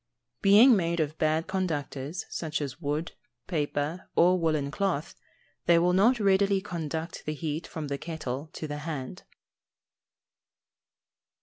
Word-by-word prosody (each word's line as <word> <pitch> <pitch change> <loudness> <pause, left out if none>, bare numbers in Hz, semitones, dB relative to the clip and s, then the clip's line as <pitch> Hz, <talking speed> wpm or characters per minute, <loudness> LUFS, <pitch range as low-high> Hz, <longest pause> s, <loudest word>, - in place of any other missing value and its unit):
_ - - -50
Being 220 +6 +7
made 170 -3 0
of 155 -1 0
bad 155 +1 +2
conductors, 160 -4 -3
such 155 -2 -3
as 140 +1 -5
wood, 150 +2 -2 0.3
paper, 150 +1 -2
or 180 +2 +5
woollen 155 -4 0
cloth, 175 -4 -1 0.5
they 170 - +6
will 175 +1 +3
not 230 +7 +4
readily 195 -1 +3
conduct 165 -3 -5
the 155 - -1
heat 155 +1 -4
from 155 -2 -5
the 140 0 -3
kettle 155 -3 -5
to 155 - -5
the 145 0 -5
hand. 150 -4 -5
160 Hz, 135 wpm, -28 LUFS, 150-180 Hz, 0.5 s, Being